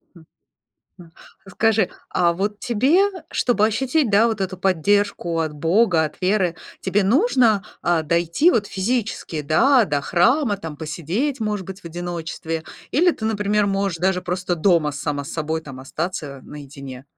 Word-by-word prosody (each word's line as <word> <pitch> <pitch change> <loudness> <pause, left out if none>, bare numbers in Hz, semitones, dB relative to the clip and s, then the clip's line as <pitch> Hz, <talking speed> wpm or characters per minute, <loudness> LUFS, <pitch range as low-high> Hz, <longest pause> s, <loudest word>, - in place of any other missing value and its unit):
М. 165 -2 -16 0.8
М, 165 -2 -15 0.3
а - - -11
скажи, 220 -2 +2 0.2
а 170 -1 +2
вот 205 +4 -2
тебе, 255 - +2
э, 385 -5 -4
чтобы 225 -4 +2
ощутить, 255 +3 0
да, 210 +3 +5
вот 225 -3 -2
эту 190 -1 -2
поддержку 190 -1 +1
от 160 -2 -2
Бога, 165 +3 +2
от 150 - -7
веры, 185 -3 +1 0.2
тебе 195 +1 +1
нужно, 235 - +3 0.2
а, 170 -2 +2
дойти 170 - +2
вот 215 - +1
физически, 200 -6 -2
да, 235 - +4
до 145 -5 -1
храма, 205 - +2
там 160 -6 -8
посидеть, 170 - -2
может 210 -4 -2
быть, 190 0 -8
в - - -31
одиночестве, 165 -1 -5 0.3
или 350 +5 +4
ты, 220 - -7
например, 210 -1 +1
можешь 195 -3 -1
даже 180 0 +1
просто 180 0 -2
дома 165 -3 +3
сама 145 0 -3
с - - -8
собой 160 0 -2
там 135 -4 -10
остаться, 150 0 -5
э, - - -15
наедине. 140 -3 -10
185 Hz, 165 wpm, -21 LUFS, 160-215 Hz, 0.8 s, да